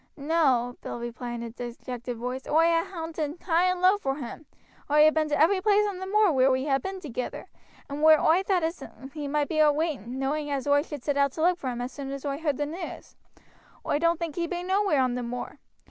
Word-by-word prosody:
"No," 275 -5 +1
Bill - - -6
replied 240 +1 -5
in 235 - -5
a 235 - -5
dejected 245 0 -6
voice. 250 +3 -5
"Oi 320 +2 +4
ha' 335 0 +2
hoonted 325 -3 -5
high 345 0 +2
and 365 -1 0
low 375 +3 +5
vor 270 -8 -1
him; 285 +2 -8 0.4
oi 300 +1 +6
ha' 310 - +4
been 310 -1 +1
to 295 - 0
every 375 +5 +4
place 420 +1 +4
on 390 -3 -4
the 375 - -5
moor 420 -1 +4
wheer 265 -2 +4
we 260 +1 +1
ha' 270 -1 +2
been 385 0 -5
together, 255 -7 -5 0.4
and 285 +1 -5
wheer 310 0 +7
oi 335 +4 +4
thowt 380 -3 +1
as 325 -1 -2 0.3
he 300 -2 -5
might 290 0 0
be 310 - -1
a 305 -1 +6
waiting 285 - -3
knowing 290 +3 -2
as 280 -1 -2
oi 285 0 +4
should 295 -4 -8
set 290 -1 -1
out 280 -1 +2
to 315 - -5
look 355 +1 +3
for 260 - -3
him 245 -1 -4
as 245 +1 -4
soon 270 +1 -7
as 275 +1 -6
oi 280 0 -2
heard 300 -4 -1
the 295 - -1
news. 330 +5 -7 0.7
Oi 290 - +1
don't 335 +1 +2
think 335 -3 -4
he 340 -1 0
be 350 +1 -4
nowhere 375 -7 +2
on 255 -1 0
the 250 - -2
moor. 245 +1 -6
295 Hz, 245 wpm, -27 LUFS, 260-335 Hz, 0.7 s, wheer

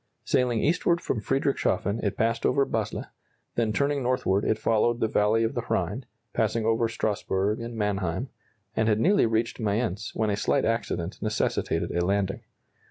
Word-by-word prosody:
Sailing 125 -3 +1
eastward 170 +2 +2
from 110 - -2
Friedrichshafen 135 -5 0
it 100 - -1
passed 115 +1 +1
over 140 -1 +3
Basle, - - -2 0.5
then 115 -2 +1
turning 140 +4 +1
northward 125 -6 +1
it 110 - +1
followed 115 +2 +2
the 110 - +2
valley 110 +1 +2
of 115 - 0
the - - -1
Rhine, - - -1 0.3
passing 115 -1 0
over 115 +1 +2
Strasburg 105 -2 -1
and 115 0 -6
Mannheim, 100 +2 -1 0.5
and 110 - +2
had 110 -1 +3
nearly 195 - +4
reached 115 +1 -1
Mayence 105 -2 -1
when 110 -1 +1
a - - +1
slight - - +1
accident 110 -6 -2
necessitated 110 0 -1
a 85 - 0
landing. 95 +1 0
110 Hz, 165 wpm, -27 LUFS, 105-120 Hz, 0.5 s, nearly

